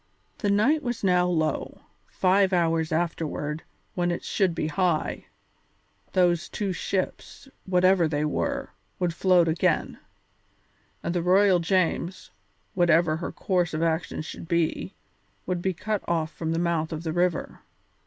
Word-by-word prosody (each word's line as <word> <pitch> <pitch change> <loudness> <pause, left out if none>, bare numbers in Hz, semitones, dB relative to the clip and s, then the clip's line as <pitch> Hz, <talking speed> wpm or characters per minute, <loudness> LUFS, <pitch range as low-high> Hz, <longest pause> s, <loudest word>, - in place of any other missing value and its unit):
The 205 - 0
tide 245 +10 +3
was 245 -6 -4
now 180 -2 +3
low; 160 -4 -1 0.3
five 190 +1 +2
hours 165 -2 +1
afterward, 160 -2 -2 0.3
when 175 -1 0
it 175 - -3
should 185 -4 0
be 155 - -1
high, 160 +1 -1 0.9
those 175 -2 +2
two 200 -3 -2
ships, 185 - -4 0.2
whatever 185 -1 +4
they 150 -1 -1
were, 150 - -2 0.3
would 175 -2 -1
float 180 -1 +4
again, 160 +1 0 1.0
and 170 - -1
the 175 - 0
Royal 185 +1 +4
James, 180 0 -1 0.4
whatever 170 -3 +3
her 170 - -4
course 180 -4 0
of 155 - -1
action 160 -1 -1
should 165 - -8
be, 170 +3 -1 0.5
would 180 -1 -2
be 190 - 0
cut 210 +3 -2
off 165 -2 -1
from 160 -1 -3
the 165 - 0
mouth 170 -2 0
of 160 0 -5
the 160 -2 -2
river. 175 0 -1
175 Hz, 145 wpm, -26 LUFS, 165-185 Hz, 1.0 s, whatever